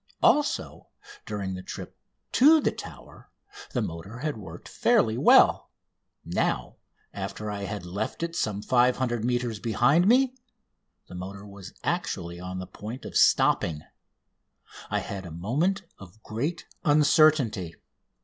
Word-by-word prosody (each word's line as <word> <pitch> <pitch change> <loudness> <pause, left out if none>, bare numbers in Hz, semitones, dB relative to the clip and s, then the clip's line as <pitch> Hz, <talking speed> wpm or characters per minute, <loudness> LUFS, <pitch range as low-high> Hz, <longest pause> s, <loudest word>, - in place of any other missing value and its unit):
Also, 295 0 +2 0.4
during 100 -3 -3
the 90 - -6
trip - - -8 0.4
to 310 +5 +6
the - - +1
Tower - - -11 0.4
the 125 - -1
motor 90 +5 -7
had 150 +3 -3
worked 105 - -10
fairly 110 - +2
well. - - +5 0.6
Now, - - -1 0.4
after 105 0 -5
I 100 -1 -4
had 90 -1 -5
left 95 - -4
it 170 0 -3
some 105 - -2
500 125 -1 +2
metres 120 -2 -1
behind 125 - +3
me, 255 +3 +4 0.7
the - - -12
motor 95 +3 -7
was 100 -2 -11
actually 85 0 -2
on 90 +1 -6
the 95 - -5
point 110 +7 -8
of - - -8
stopping. 75 -3 +3 1.1
I - - 0
had 95 -1 -6
a 90 - -8
moment 145 - -1 0.2
of 100 +3 -14
great 140 +11 -3 0.2
uncertainty. 145 - +3
110 Hz, 130 wpm, -27 LUFS, 95-145 Hz, 1.1 s, to